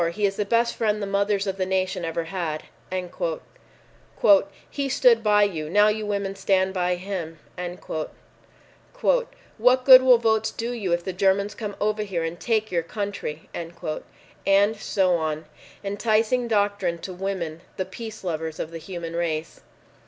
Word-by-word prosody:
He 205 +3 0
is 195 -1 0
the 210 - -1
best 235 +3 +2
friend 215 -2 +1
the 205 - -2
mothers 200 0 +1
of 195 -1 -2
the 185 - 0
nation 185 -1 -1
ever 165 0 -2
had" 165 -3 -3 2.1
"He 280 -1 -2
stood 470 - +4
by 210 -1 +5
you. 160 -7 -1
Now 205 +4 +5
you 215 0 -2
women 200 -1 -1
stand 190 -1 +1
by 180 -1 +1
him." 175 -3 -5 1.7
"What 260 - +1
good 260 -1 +11
will 255 -1 +7
votes 220 -1 +1
do 230 +2 -4
you 210 -7 -3
if 170 0 +1
the 190 - -4
Germans 195 +2 +2
come 210 -3 -5
over 215 +1 0
here 190 -5 -2
and 165 +1 -4
take 220 -2 0
your 170 -2 +1
country?" 170 -4 -5
And 170 0 -6 1.0
so 190 -4 +1
on. 155 -1 -3 0.4
Enticing 220 +4 +1
doctrine 205 -5 +1
to 185 +2 -7
women—the 180 -1 -4
peace 220 +3 -8
lovers 160 -3 -3
of 160 - -4
the 165 - -6
human 170 -1 -6
race. 165 -2 -2
195 Hz, 150 wpm, -24 LUFS, 170-215 Hz, 2.1 s, good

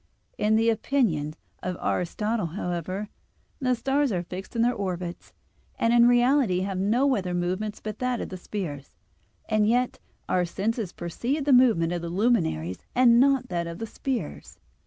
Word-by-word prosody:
In 215 +1 +2
the 225 +1 +4
opinion 205 - 0 0.3
of 180 -1 -3
Aristotle, 210 +3 -1
however, 180 +3 -4 0.5
the 255 -3 +1
stars 270 +3 +1
are 180 -3 -1
fixed 185 +6 -8
in 230 - +2
their 245 +1 +3
orbits, 180 -4 -4 0.5
and 230 0 +2
in 240 0 +7
reality 245 -5 +3
have 190 -1 -2
no 245 +8 +2
other 180 -3 -2
movement 185 +4 -2
but 215 -1 -5
that 250 -2 0
of - - -4
the 185 - -6
spheres; 170 -8 -6 0.5
and 215 -1 +2
yet 245 +2 +1 0.3
our 180 - +2
senses 200 +3 -2
perceive 245 - -3
the 285 - +4
movement 220 -10 +4
of 175 - -2
the 170 - -4
luminaries 165 - +1 0.2
and 240 -2 +6
not 270 -1 +3
that 170 -1 -2
of 170 0 -6
the 225 - -4
spheres 235 - -4
(De - - -38
Coel. - - -41
210 Hz, 175 wpm, -26 LUFS, 175-245 Hz, 0.5 s, in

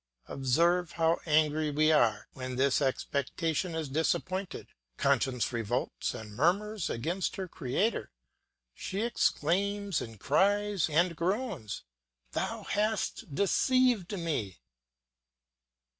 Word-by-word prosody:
Observe 170 +6 +1
how 165 0 +2
angry 155 0 +3
we 155 +2 +3
are 110 -8 +3
when 130 -1 -5
this 135 +2 +2
expectation 155 +5 -1
is 160 -2 -2
disappointed. 185 +6 -1 0.3
Conscience 130 -3 +1
revolts 115 -3 -2
and 110 -1 -8
murmurs 200 - +1
against 170 +10 -2
her 190 -1 -4
Creator; 160 - -1 0.6
she 195 - -4
exclaims 200 -4 0
with 115 -1 -8
cries 200 - +2
and 170 +3 +2
groans, 185 - -2 0.5
"Thou - - -3
hast 210 -7 -1
deceived 240 - +2
me." 145 - -2
165 Hz, 100 wpm, -30 LUFS, 135-195 Hz, 0.6 s, angry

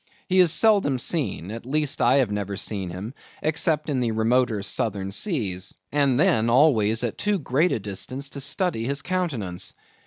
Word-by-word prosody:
He 185 0 +2
is 175 -3 +6
seldom 200 - +4
seen; 125 - -2
at 115 +1 -7
least 150 +3 -1
I 125 +3 +4
have 130 -6 +2
never 100 -1 -3
seen 100 -3 -2
him 95 +7 -7 0.3
except 155 0 +1
in 140 -4 -1
the 120 -2 0
remoter 110 -1 +1
southern 100 -2 -2
seas, 100 - -2 0.2
and 140 -3 +2
then 115 -6 +3
always 115 -4 +3
at 120 - -3
too 205 -1 +1
great 155 +2 +1
a - - +1
distance 125 +7 -6
to 140 - -6
study 140 - -1
his 140 +2 -2
countenance. 130 - -3
125 Hz, 175 wpm, -24 LUFS, 105-155 Hz, 0.3 s, is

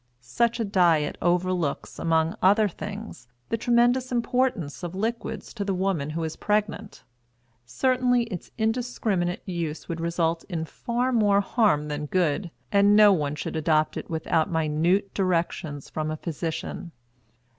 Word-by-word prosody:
Such 235 - 0
a 225 - 0
diet 170 -6 +2
overlooks, 175 -3 0
among 160 0 +1
other 205 +3 +5
things, 200 - -8 0.2
the - - +1
tremendous 245 +2 +2
importance 240 - 0
of 175 0 -5
liquids 225 +4 -3
to 210 - -3
the 195 -1 -1
woman 180 -6 -1
who 165 +2 -3
is 160 -1 -3
pregnant. 210 0 -2 0.6
Certainly 250 - +2
its 200 -7 -7
indiscriminate 220 -6 -1
use 170 -4 -4
would 165 -1 -4
result 170 0 0
in 165 -3 -2
far 245 +9 -2
more 205 -4 +4
harm 195 -9 +2
than 150 0 -4
good; 175 +1 0 0.2
and 200 0 +5
no 210 -1 +8
one 150 -4 -1
should 150 - -5
adopt 155 -1 +1
it - - -6
without 160 -1 0
minute 165 +5 +1
directions 170 -6 -1
from 155 0 -3
a 155 - -3
physician. 165 +2 -5
180 Hz, 145 wpm, -26 LUFS, 160-215 Hz, 0.6 s, no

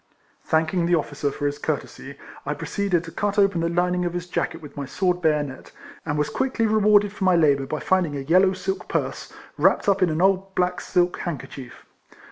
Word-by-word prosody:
Thanking 160 +2 +1
the 175 - +4
officer 145 -2 -2
for 145 - -5
his 145 0 -1
courtesy, - - -4 0.3
I - - -3
proceeded 195 -5 -1
to 165 - -9
cut 205 +2 -2
open 195 -4 +3
the 165 - 0
lining 180 +1 +1
of 175 -1 -2
his 175 -1 -3
jacket 170 -2 -3
with 150 -3 -12
my 145 - -4
sword 180 +3 0
bayonet, 150 -5 -1 0.4
and 145 -1 -1
was 150 - 0
quickly 260 -3 0
rewarded 210 -1 +4
for 210 - -5
my 185 -1 +4
labour 140 -5 +3
by 155 +2 -4
finding 180 -6 +1
a - - -4
yellow 185 +7 +4
silk 190 +1 -4
purse, - - -3 0.3
wrapped - - +3
up 200 -1 +3
in 185 - +4
an 155 0 -1
old 190 +1 +1
black 180 0 0
silk 180 0 0
handkerchief. 135 -6 -7
175 Hz, 200 wpm, -23 LUFS, 155-190 Hz, 0.4 s, the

